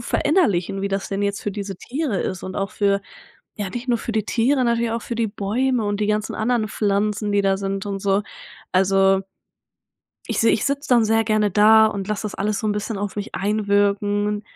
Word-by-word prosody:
verinnerlichen, 195 - +1
wie 200 - 0
das 195 0 -2
denn 195 +1 -2
jetzt 200 0 -2
für 205 - -3
diese 200 -1 -5
Tiere 265 - -3
ist 185 - -4
und 185 0 -6
auch 195 -1 -2
für 200 -1 +1 0.6
ja 205 -2 -3
nicht 245 +5 -6
nur 240 -1 +2
für 230 - -4
die 215 -2 0
Tiere, 255 +4 +1
natürlich 235 -1 +1
auch 230 - -3
für 235 - -5
die 230 -1 +1
Bäume 225 +4 -1
und 205 0 -1
die 210 - +1
ganzen 210 0 -1
anderen 220 -1 0
Pflanzen, 210 0 0
die 200 0 +2
da 195 0 +2
sind 195 0 -3
und 200 -1 -3
so. 195 +1 +1 0.5
Also 195 +1 +3 1.0
ich - - -1
seh 225 - +4
ich 215 - +1
sitz’ 280 +1 -1
dann 240 -3 +4
sehr 225 +1 +3
gerne 215 -1 +1
da 215 +3 +6
und 200 -2 -3
lass 210 -1 -2
das 210 -2 -5
alles 205 +1 -1
so 220 - -2
'n 210 - +1
bisschen 210 +1 -3
auf 200 0 -4
mich 205 0 -5
einwirken, 205 0 +1
210 Hz, 215 wpm, -22 LUFS, 200-225 Hz, 1.0 s, da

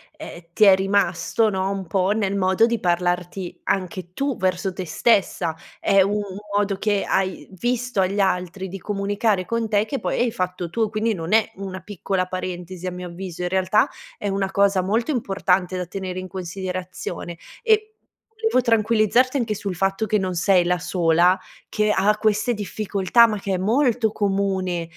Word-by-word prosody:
e 310 0 -9
ehm, 170 - -11
ti 215 - +3
è 200 -2 +9
rimasto, 200 +3 +1
no, 190 -1 -1
un 195 -1 -3
po' 185 +3 +1
nel 205 -2 0
modo 190 +3 +3
di 235 -1 -1
parlarti 175 +1 -1
anche 185 -2 -2
tu 275 +3 -2
verso 185 +1 0
te 185 - -5
stessa. 180 -2 +1 0.3
È 195 -1 +4
u 195 +2 +2
un 205 -2 -3 0.2
modo 205 -1 +1
che 205 0 0
hai 190 -1 -1
visto 245 +3 -2
agli 190 +2 +1
altri 190 0 -1
di 195 +2 -7
comunicare 200 0 0
con 230 +1 -1
te 210 -1 +2
che 275 +3 -3
poi - - -2
hai 240 -1 +2
fatto 180 -3 -3
tu, 220 +4 0
quindi 220 +1 0
non 165 0 -4
è 220 0 +3
una 190 -1 -6
piccola 195 -2 -2
parentesi 185 -1 -5
a - - -2
mio 180 0 -6
avviso, 180 0 -7
in 180 - -1
realtà 190 +3 +2 0.3
è 205 - -4
una 195 0 -1
cosa 200 -1 +3
molto 225 +9 0
importante 190 -6 0
da 180 - -3
tenere 185 0 -5
in 185 - -6
considerazione. 185 -1 -5 0.3
E 435 -2 +3 0.5
volevo 445 - +2
tranquillizzarti 230 +3 +3
anche 225 -4 -1
sul 195 -2 -4
fatto 195 +4 0
che 215 0 +1
non 185 -2 -2
sei 180 +1 +3
la 180 +1 +2
sola 175 0 +2 0.3
che 215 0 +1
ha 205 +1 +3
queste 215 +2 +1
difficoltà, 210 +1 +2
ma 215 -2 -2
che 195 0 -2
è - - +1
molto 225 +2 +2
comune, 195 -4 -1
195 Hz, 180 wpm, -22 LUFS, 185-215 Hz, 0.5 s, è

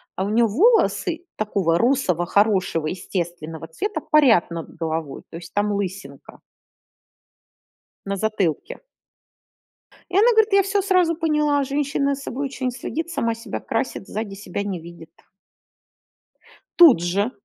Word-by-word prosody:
а 190 - -2
у 200 - -2
нее 230 +2 +3
волосы 350 - +2
такого 195 -6 0
русого 230 - +1
хорошего 190 -5 +1
естественного 170 -2 -5
цвета 410 - -3
парят 265 - +4
над 170 -1 -7
головой, 160 -3 -4
то - - -11
есть 170 0 -12
там 205 0 0
лысинка 190 -8 -6 1.7
на 200 0 -2
затылке. 200 -6 -1 1.4
И 360 - -5
она 440 +4 +6
говорит: 440 -2 +3
"Я 395 - +6
всё 395 +1 0
сразу 365 -4 +2
поняла, 300 -3 +1
женщина 280 0 0
за 275 - -10
собой 275 +1 -4
очень 265 -2 -3
следит, 325 +6 -5
сама 230 -9 -1
себя 230 +1 -6
красит, 230 -4 -3
сзади 210 -2 -5
себя 200 0 -5
не 195 -3 -4
видит". 170 0 -12 1.7
Тут 320 - +8
же, 200 +7 0
215 Hz, 135 wpm, -22 LUFS, 175-295 Hz, 1.7 s, Тут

